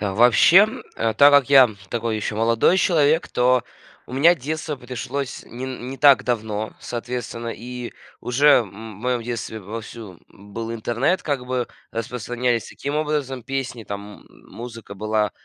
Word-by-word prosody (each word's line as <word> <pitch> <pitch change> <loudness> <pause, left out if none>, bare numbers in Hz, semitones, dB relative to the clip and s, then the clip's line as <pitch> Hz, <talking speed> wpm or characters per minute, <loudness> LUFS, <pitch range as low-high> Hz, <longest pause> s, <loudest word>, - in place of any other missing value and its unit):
Вообще, 120 - +6 0.3
э, 115 -1 0
так 145 0 +7
как 140 -2 +4
я 135 -3 +8 0.2
такой 115 -2 -2
еще, 105 0 -3
молодой 115 - +3
человек, 160 -3 +2
то 125 0 +2 0.4
у - - -12
меня 165 +6 +5
детство 155 +2 -4
пришлось 125 +2 -5
не 125 +2 -8
н 130 -1 -6
не 135 - -6
так 140 0 +6
давно, 110 -3 -2
соответственно. 120 -1 -5
И 125 0 -7 0.3
уже, 135 +5 +2 0.2
м, 105 +1 -11
в - - -14
моем 125 -1 0
детстве 115 -2 -5
вовсю 110 -2 -9
был 115 +3 -8
интернет, 120 +10 0
как 140 -4 -2
бы 125 -1 -2 0.2
распространялись 120 +1 -2
таким 145 +2 -4
образом 145 -5 -2
песни, 135 -4 -4
там 100 0 -8
музыка 115 -3 -11
была, 110 +1 0
120 Hz, 150 wpm, -22 LUFS, 110-135 Hz, 0.4 s, я